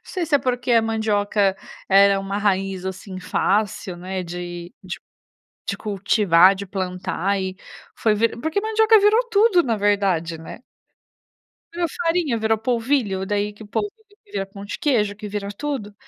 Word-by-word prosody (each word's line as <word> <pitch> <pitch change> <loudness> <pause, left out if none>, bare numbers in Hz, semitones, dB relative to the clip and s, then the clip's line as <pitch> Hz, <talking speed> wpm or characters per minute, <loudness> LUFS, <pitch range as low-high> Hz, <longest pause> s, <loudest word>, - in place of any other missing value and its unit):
não - - -48
sei 365 -5 -3
se 295 - 0
é - - -1
porque 250 -1 -2
a 230 -1 +5
mandioca 205 -3 +1 0.3
era 195 0 +5
uma 195 +1 -3
raiz 195 -2 0
assim 190 0 -6
fácil, 195 -1 0
né, 185 +1 -4
de 175 0 -7
de 180 - -5 0.7
de - - -1
cultivar, 195 -3 +4
de 200 - -6
plantar 185 0 -2
e 185 0 -4 0.4
foi 220 -2 +2
ve 230 +2 +3
porque 320 +6 -1
mandioca 440 0 +4
virou 420 +3 +5
tudo 405 -4 +4
na 230 -3 0
verdade, 195 -5 +1
né. 160 - -10 1.2
A 345 0 0 0.2
farinha, 330 -8 +1
virou 220 0 +1
polvilho, 230 -4 0
daí 205 +1 -1
que 210 +1 -12
polvilho 410 - -2 0.3
vira 195 - -4
pão 200 +1 -11
de - - -6
queijo, 225 - +1
que 210 0 -7
vira 200 -1 -4
tudo. 235 -3 -4
205 Hz, 160 wpm, -22 LUFS, 190-245 Hz, 1.2 s, a